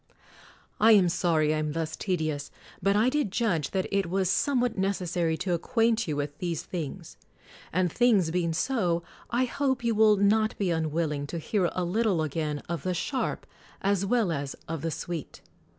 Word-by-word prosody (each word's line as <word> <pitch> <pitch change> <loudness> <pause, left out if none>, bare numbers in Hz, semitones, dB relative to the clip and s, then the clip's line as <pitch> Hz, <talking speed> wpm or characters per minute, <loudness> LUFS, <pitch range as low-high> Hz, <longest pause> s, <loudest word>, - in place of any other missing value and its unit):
I 225 +1 +7
am 190 -4 +5
sorry 160 -3 +2
I 155 - 0
am 150 -1 -2
thus 160 -1 -3
tedious: 155 -7 -2 0.3
but 195 +2 +2
I 215 +3 +4
did 285 -7 0
judge 185 - 0
that 190 -1 -1
it 200 -3 0
was 190 0 +1
somewhat 250 -4 +1
necessary 180 -4 0
to 185 +1 -2
ac 170 - 0
quaint 230 -2 +1
you 150 - -1
with 145 +1 -4
these 170 -3 -2
things. 165 -6 -6 0.5
And 180 -1 +1
things 210 -8 +3
be 180 +1 0
ing 165 -1 -1
so, 175 -3 0 0.3
I 245 +2 +2
hope 265 0 -1
you 235 -1 +2
will 215 -1 +5
not 215 +2 +2
be 190 -4 0
unwilling 155 -3 -1
to 170 - -5
hear 180 +2 0
a 185 - -1
little 185 -2 +1
again 150 -1 -3
of 170 -1 -3
the 185 -1 -2
sharp 260 - -2 0.4
as 200 -1 +2
well 220 -2 +1
as 140 -3 -3
of 165 -2 -4
the 165 - -1
sweet! 165 -1 -5
180 Hz, 185 wpm, -27 LUFS, 160-215 Hz, 0.5 s, I